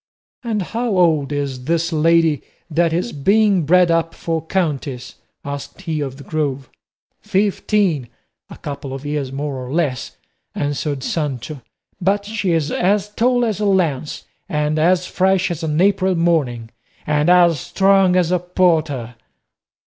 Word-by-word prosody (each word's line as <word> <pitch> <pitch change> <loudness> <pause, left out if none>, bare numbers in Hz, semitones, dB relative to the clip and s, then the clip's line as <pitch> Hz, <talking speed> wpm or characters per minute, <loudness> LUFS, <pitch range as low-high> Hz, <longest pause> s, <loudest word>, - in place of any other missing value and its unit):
"And 220 -4 -1
how 225 +1 -2
old 155 -5 +3
is 140 -3 -3
this 170 +2 0
lady 160 -1 +3 0.3
that 165 +1 +2
is 175 +8 -1
being 195 +2 +2
bred 180 +1 +5
up 165 0 0
for 165 -1 -2
a - - -10
countess?" 145 -8 -2 0.3
asked 140 +6 -7
he 160 -5 -3
of 135 -2 -4
the 140 - -11
Grove. 140 -4 -3 0.5
"Fifteen, 195 - 0 0.4
a - - -10
couple 140 -2 -6
of 135 +2 -9
years 145 -3 -2
more 135 -1 -4
or 125 - -7
less," 145 -6 -2 0.4
answered 145 -1 -2
Sancho; 145 -2 -3 0.4
"but 200 +3 +1
she 210 -3 -2
is 160 -3 0
as 200 +2 +1
tall 245 +3 +2
as 215 -3 -2
a 210 - +1
lance, 165 -7 0 0.2
and 150 0 0
as 180 +3 +3
fresh 190 0 +1
as 170 -1 -4
an 155 -1 -1
April 190 -1 +3
morning, 140 -10 0 0.3
and 150 +2 +1
as 175 -4 +5
strong 195 +2 +3
as 180 -2 +2
a 180 - +2
porter." 160 -9 0
165 Hz, 150 wpm, -19 LUFS, 145-185 Hz, 0.5 s, bred